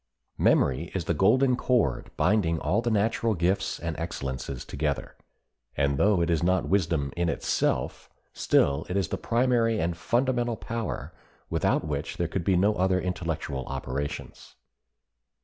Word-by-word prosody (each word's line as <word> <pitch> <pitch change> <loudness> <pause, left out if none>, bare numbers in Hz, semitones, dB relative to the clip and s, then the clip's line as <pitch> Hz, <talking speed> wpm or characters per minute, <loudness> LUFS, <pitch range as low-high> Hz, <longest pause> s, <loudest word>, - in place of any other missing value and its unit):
Memory 70 +6 +2
is 90 -4 -2
the 85 - +1
golden 125 - +4
cord 120 - +1
binding 90 -4 +2
all 100 +7 0
the 120 - -1
natural 110 +1 +1
gifts 90 +3 0
and 85 -2 -3
excellences 70 -5 -4
together, 75 0 -3 0.6
and 70 0 +1
though 100 -3 +4
it 85 0 +1
is 80 -2 +1
not 90 +1 +1
wisdom 80 -8 0
in 85 -1 0
itself, - - -1 0.2
still 70 +2 +2
it 90 - -1
is 95 -5 0
the - - -1
primary 115 -2 +2
and 85 +1 -1
fundamental 120 +4 0
power 115 -1 -5 0.4
without - - +1
which 75 0 -3
there 85 - 0
could 85 +1 -3
be 95 +1 +2
no 100 +4 +3
other 95 0 +2
intellectual 80 -7 -3
operations. 65 +2 -5
90 Hz, 150 wpm, -27 LUFS, 80-110 Hz, 0.6 s, golden